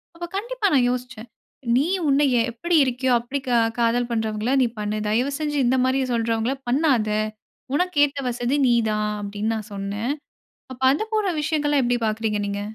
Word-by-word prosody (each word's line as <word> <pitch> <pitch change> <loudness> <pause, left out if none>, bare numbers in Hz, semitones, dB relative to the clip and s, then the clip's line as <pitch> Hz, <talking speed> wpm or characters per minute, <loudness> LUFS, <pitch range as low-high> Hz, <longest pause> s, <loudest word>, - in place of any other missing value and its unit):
அப்ப 345 +1 -5
கண்டிப்பா 470 0 -1
நான் 245 -2 +4
யோசிச்சேன். 245 -2 -6 0.5
நீ 285 +5 +2 0.2
உன்ன 275 +1 +3 0.3
எப்பிடி 335 +9 0
இருக்கியோ 255 0 0
அப்பிடி 250 +4 -4
க - - -1 0.3
காதல் 240 +1 +1
பண்றவங்கள 220 0 -1
நீ - - +2
பண்ணு. 210 0 -2
தயவுசெஞ்சு 280 +6 -1
இந்தமாரி 260 +2 +2
சொல்கின்றவங்கள 230 +2 0
பண்ணாத! 260 -5 +2 0.7
உனக்கு 360 +1 0
ஏத்த 280 0 -6
வசதி 245 +2 -1
நீ 240 - +4 0.2
தான் 210 0 0
அப்பிடி 205 0 -6
நான் 215 -1 -6
சொன்னேன். 200 +5 -3 0.6
அப்போ 260 +1 -5
அத 290 - -1
போன்ற 420 -3 +1
விஷயங்கள்லாம் 295 -2 +1
எப்படி 245 0 +1
பார்க்கிறீங்க 215 -1 -1
நீங்க? 200 0 -3
245 Hz, 155 wpm, -23 LUFS, 220-285 Hz, 0.7 s, நான்